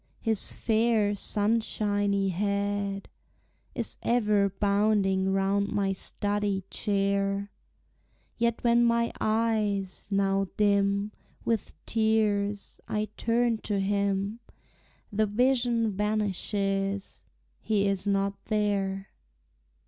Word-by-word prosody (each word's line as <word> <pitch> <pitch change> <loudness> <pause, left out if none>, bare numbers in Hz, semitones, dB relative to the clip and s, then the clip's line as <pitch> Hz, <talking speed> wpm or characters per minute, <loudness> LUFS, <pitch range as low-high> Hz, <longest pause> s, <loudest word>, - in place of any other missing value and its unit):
His 220 -3 +1
fair 220 -2 +2
sunshiny 205 -2 0
head 200 +1 -1 0.7
Is - - -2
ever 210 -4 +2
bounding 200 -1 +2
round 195 +1 +1
my 200 -1 0
study 205 0 -2
chair; 200 -1 0 0.8
Yet 235 -1 0
when 235 0 +4
my 235 0 +2
eyes, 215 -3 0
now 195 -1 +1
dim 200 0 +2 0.3
With 225 -3 -1
tears, 210 -2 0
I 215 0 -2
turn 230 0 +1
to 205 -2 -2
him, 200 +2 0 0.7
The 215 +1 +2
vision 240 0 +2
vanishes, 200 -1 -1 0.4
he 205 -2 +1
is 195 0 -1
not 200 0 0
there! 200 -2 -1
205 Hz, 90 wpm, -28 LUFS, 195-220 Hz, 0.8 s, when